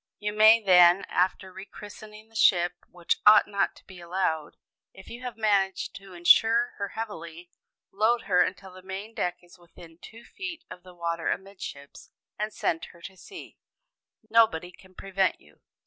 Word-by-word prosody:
You 210 0 -4
may 215 +2 +7
then 180 -2 +5
(after 185 +1 -1
re 190 - -9
christening 210 +1 -12
the 225 - -25
ship, 175 -4 +3 0.2
which 175 -1 -2
ought 210 0 +7
not 200 -1 -1
to - - -20
be 185 -1 -13
allowed), 170 -3 -3 0.4
if 190 - -14
you 240 - -9
have 250 -2 -7
managed 200 -3 0
to 195 -1 -14
insure 225 +7 +4
her 200 -1 -4
heavily, 170 -5 -7 0.4
load 220 +4 +1
her 180 -3 +2
until 190 +1 -3
the 185 - -13
main 195 +4 -8
deck 180 -4 -3
is 175 +1 -19
within 170 -1 -17
two 225 +5 -13
feet 345 -4 -8
of 180 - -10
the 180 0 -16
water 170 -1 -3
amidships, 185 -7 -7 0.3
and 210 +1 -2
send 165 -5 -2
her 170 - -17
to 190 - -10
sea. 365 - -13 0.7
Nobody 215 -6 +2
can 185 +1 -20
prevent 195 0 -1
you. 75 0 -24
190 Hz, 170 wpm, -26 LUFS, 175-215 Hz, 0.7 s, may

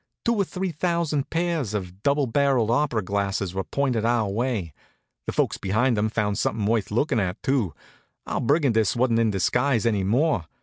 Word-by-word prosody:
Two 235 - +3
or 200 - +3
three 185 0 -3
thousand 165 -3 -1
pairs 165 - -1
of 95 -1 -5
double 140 +2 +2
barrelled 130 -2 +2
opera 120 -4 +1
glasses 100 -1 -2
were 95 0 -2
pointed 130 -4 -1
our 115 -2 +2
way. 105 - -2 0.5
The - - -1
folks - - 0
behind 115 +6 +1
'em 105 +1 +1
found 105 -3 -1
something 110 -2 -1
worth 110 -1 +1
lookin' 120 +3 +1
at, 95 0 -3
too. 125 - 0 0.5
Our - - -2
Brigandess 115 - +2
wasn't 120 -1 +2
in 115 -1 +3
disguise 120 +5 +1
any 105 -4 +1
more. 115 - +1
115 Hz, 175 wpm, -24 LUFS, 105-140 Hz, 0.5 s, Two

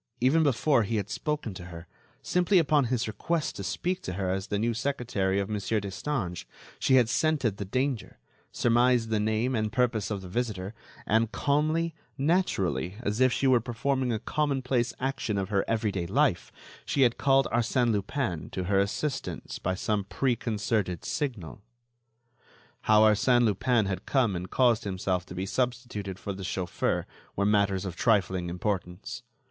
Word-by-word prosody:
Even 135 +7 +4
before 140 -2 +3
he 110 +2 -1
had 105 -1 -2
spoken 150 -8 -2
to 90 -2 -9
her, 85 -1 -9 0.4
simply 180 +2 +2
upon 150 -4 +4
his 125 -1 -1
request 155 +9 -2
to 100 - -5
speak 180 - -2
to 90 - -5
her 95 0 -1
as 95 0 -2
the 100 - -1
new 115 +3 0
secretary 110 -7 -1
of 100 - -1
Monsieur 105 +1 -1
Destange, 100 - -4 0.3
she 130 - +3
had 125 -3 +5
scented 125 -4 +1
the 100 - -4
danger, 130 +3 -2 0.3
surmised 120 -1 +3
the 110 -1 +1
name 110 +4 0
and 110 -2 0
purpose 115 -4 +1
of 100 -3 -3
the - - -8
visitor, 100 -1 -3 0.3
and, 110 +1 +2
calmly, 155 +5 +1 0.2
naturally, 100 - 0
as 105 +2 -1
if 130 -1 +5
she 135 - 0
were 130 -2 +5
performing 130 +2 -1
a 110 - 0
commonplace 130 -1 0
action 130 -5 -2
of 95 -1 -2
her 100 -2 +1
every 110 -2 0
day 90 -3 -3
life, - - +1 0.3
she 135 - +2
had 120 -2 +2
called 135 -2 +4
Arsène 120 +1 +2
Lupin 105 - -2
to 95 - -3
her 95 +2 +2
assistance 135 +8 -3
by 95 +1 -1
some 105 +1 -1
preconcerted 110 - -1
signal. 120 - -3 1.2
How 110 0 +6
Arsène 110 +3 +4
Lupin 115 +1 +2
had 95 -1 -4
come 120 -8 +2
and 90 +1 -5
caused 120 -3 +3
himself 95 -2 -2
to 90 - -9
be 95 +1 -2
substituted 120 -5 -2
for 100 0 -5
the 95 0 -7
chauffeur 90 -1 -1 0.3
were 100 - +1
matters 100 -2 +2
of 90 -3 -5
trifling 95 -5 +1
importance. 95 +5 -3
110 Hz, 165 wpm, -28 LUFS, 95-130 Hz, 1.2 s, How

